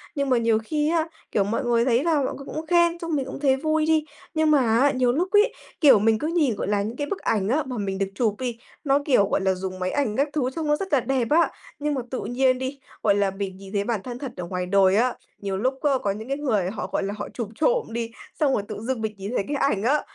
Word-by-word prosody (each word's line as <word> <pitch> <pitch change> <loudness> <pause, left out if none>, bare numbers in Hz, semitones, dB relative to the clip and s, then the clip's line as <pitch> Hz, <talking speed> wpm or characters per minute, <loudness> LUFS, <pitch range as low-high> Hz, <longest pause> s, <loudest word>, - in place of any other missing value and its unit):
Nhưng 280 -1 0
mà 255 - +4
nhiều 230 -1 +3
khi 300 +5 0
á, 330 -1 +1 0.2
kiểu, 200 - +2
mọi 230 +7 -2
người 235 -1 +2
thấy 250 +2 +2
là 335 -2 +2
mọi - - -2
người 275 - -10
cũng 310 +3 -5
khen, 345 0 +3
xong 335 -2 -2
mình 275 -2 -1
cũng 265 - -7
thấy 270 -2 +3
vui 310 +2 +1
đi, 315 -1 +2 0.3
nhưng 315 -1 +2
mà 295 - +5 0.2
á, 280 +2 +4
nhiều 255 -2 +2
lúc 350 +7 0
ấy, 420 +4 +4 0.3
kiểu, 280 -9 +7
mình 220 +1 +3
cứ 305 - -2
nhìn, 310 -9 +1
gọi - - -3
là, 205 0 +1
những 220 +4 -4
cái 290 - -2
bức 395 - -3
ảnh 205 -2 0
á, 295 +6 +2
mà 255 -2 -5
mình 195 -2 -2
được 195 0 0
chụp 215 -2 +1
đi, 245 -3 -3 0.3
nó, 280 -1 +3
kiểu, 225 -9 +3
gọi - - +1
là, 190 0 +2
dùng 185 0 -5
máy 185 0 -1
ảnh 270 -7 0
các 280 +4 +1
thứ 275 -5 0
trông 320 -2 -2
nó 295 - +4
rất 385 +3 -5
là 280 - +6
đẹp 255 -1 0
á, 330 +3 +4 0.3
nhưng 295 0 -1
mà 265 - -1
tự 260 - -2
nhiên 255 +1 +2
đi, 260 +2 -4 0.2
gọi 205 -2 +4
là, 200 -1 +1
mình 195 -1 -5
nhìn 195 +1 -11
thấy 200 -1 +1
bản 220 -2 -1
thân 245 -1 -6
thật 265 -3 -5
ở 180 - -4
ngoài 180 0 -3
đời 190 +1 +4
á, 245 +2 +2 0.2
nhiều 195 -1 -3
lúc 260 +6 -1
á, 295 - +3
có 200 - +1
những 215 +3 -6
cái 275 +1 -1
người 215 -11 0
họ, 210 - -4
gọi - - 0
là, 200 +1 -2
họ 205 - -5
chụp 230 -4 -4
trộm 485 - +1
đi, 230 0 -3 0.3
xong 285 -3 +3
rồi 205 - 0
tự - - -6
dưng 245 0 -2
mình 220 -1 -2
nhìn 200 +3 -5
thấy 200 - 0
cái 290 - -1
ảnh 210 -8 +1
á, 285 +6 +3
255 Hz, 290 wpm, -24 LUFS, 205-295 Hz, 0.3 s, kiểu